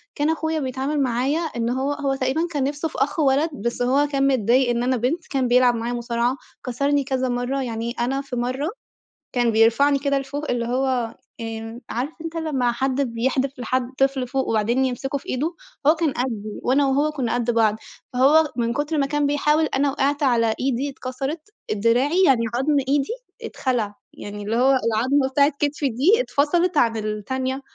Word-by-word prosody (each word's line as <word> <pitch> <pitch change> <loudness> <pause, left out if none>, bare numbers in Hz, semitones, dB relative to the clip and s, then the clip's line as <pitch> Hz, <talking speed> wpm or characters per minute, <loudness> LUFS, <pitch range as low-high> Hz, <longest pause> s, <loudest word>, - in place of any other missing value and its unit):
كان 295 +1 +1
اخويا 320 0 -1
بيتعامل 270 +2 -2
معايا 260 +4 +1
إنه 245 -8 -2
هو 280 +2 0
هو 280 -2 -1
تقريبًا 270 +5 0
كان 290 -4 -1
نفسه 290 +3 -1
في - - -9
أخ 285 +4 0
ولد 285 +2 +3
بس 235 -3 -3
هو 270 +4 +3
كان 275 -1 +1
متضايق 255 0 +3
إن 240 0 0
أنا 255 +1 +1
بنت، 265 +9 -1
كان 265 -3 0
بيلعب 245 0 +4
معايا 235 +1 -3
مصارعة، 240 +1 -1 0.3
كسرني 280 +3 +1
كذا 260 -1 -1
مرّة، 245 +3 -1
يعني 230 -1 -3
أنا 265 +3 0
في 275 -2 -7
مرّة 255 +5 -1 0.6
كان 240 -2 +2
بيرفعني 235 +6 +4
كده 280 0 +1
لفوق 285 +2 -4
اللي 240 -1 -1
هو 245 -2 -1 0.3
آمم، 225 +1 -6
عارف 250 +6 -2
أنت 330 0 -6
لمّا 275 -7 0
حد 265 +3 -1
بيحدف 260 +2 -1
لحد 250 +1 -1
طفل 270 -1 +1
فوق 265 +2 -1
وبعدين 230 +4 +1
يمسكوه 270 +2 -2
في - - -12
إيده؟ 305 +7 -1 0.3
هو 310 - +6
كان 320 -2 0
قدّي 220 -4 -3
وأنا 275 +3 +3
وهو 285 +3 +2
كنّا 260 -6 -2
قد 240 -1 0
بعض 225 -2 +3 0.4
فهو 290 +4 +4
من 235 -1 0
كتر 295 +3 -1
ما 280 - +2
كان 295 +1 0
بيحاول 300 +2 +2
أنا 280 -1 +1
وقعت 285 +2 0
على 230 -4 +2
إيدي 265 +1 0
اتكسرت، 270 +6 -5 0.2
دراعي 245 - +2
يعني 260 -6 +4
عضم 285 +4 +2
إيدي 275 0 +1 0.3
اتخلع، 245 - -2 0.2
يعني 205 0 -8
اللي 215 +2 -2
هو 255 +3 +4
العضمة 255 +5 +2
بتاعة 280 +2 +4
كتفي 290 -1 0
دي 315 - +3
اتفصلت 340 -2 +1
عن 230 -4 +3
التانية، 255 +6 -3
265 Hz, 180 wpm, -22 LUFS, 240-285 Hz, 0.6 s, هو